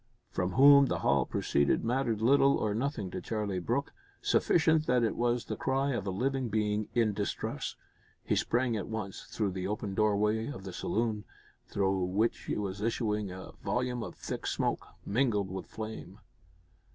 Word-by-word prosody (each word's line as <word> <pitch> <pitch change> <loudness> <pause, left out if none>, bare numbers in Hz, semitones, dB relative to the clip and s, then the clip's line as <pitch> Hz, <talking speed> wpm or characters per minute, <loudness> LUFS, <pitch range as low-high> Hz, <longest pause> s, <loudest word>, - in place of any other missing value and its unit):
From 90 0 -1
whom 140 +2 +8
the - - -2
howl 70 -2 +2
proceeded 70 +8 +1
mattered 120 -3 0
little 140 +2 +5
or 105 -1 0
nothing 115 -5 -2
to - - -4
Charlie 105 -4 -2
Brooke. 120 +10 -1 0.3
Sufficient 160 -2 +3
that 125 -1 +3
it 110 - +1
was 120 0 0
the - - -3
cry 135 +1 0
of 105 -6 -2
a - - +1
living 130 +5 -1
being 105 0 0
in 115 -3 +3
distress. 100 0 -3 0.5
He - - +1
sprang 120 -1 +1
at 105 - -3
once 110 -3 -5
through 105 -3 -1
the 95 0 -3
open 105 -1 -3
doorway 105 +2 +2
of 95 -10 -7
the 95 -2 -7
saloon, 110 +2 -1 0.4
through 95 -2 +1
which 105 +6 0
was 100 -1 -2
issuing 105 -2 -1
a 95 +1 -8
volume 125 +4 -1
of - - -6
thick - - -5
smoke, - - -1 0.2
mingled 105 -4 +1
with 95 - -5
flame. 110 -4 -7
110 Hz, 165 wpm, -31 LUFS, 100-125 Hz, 0.5 s, whom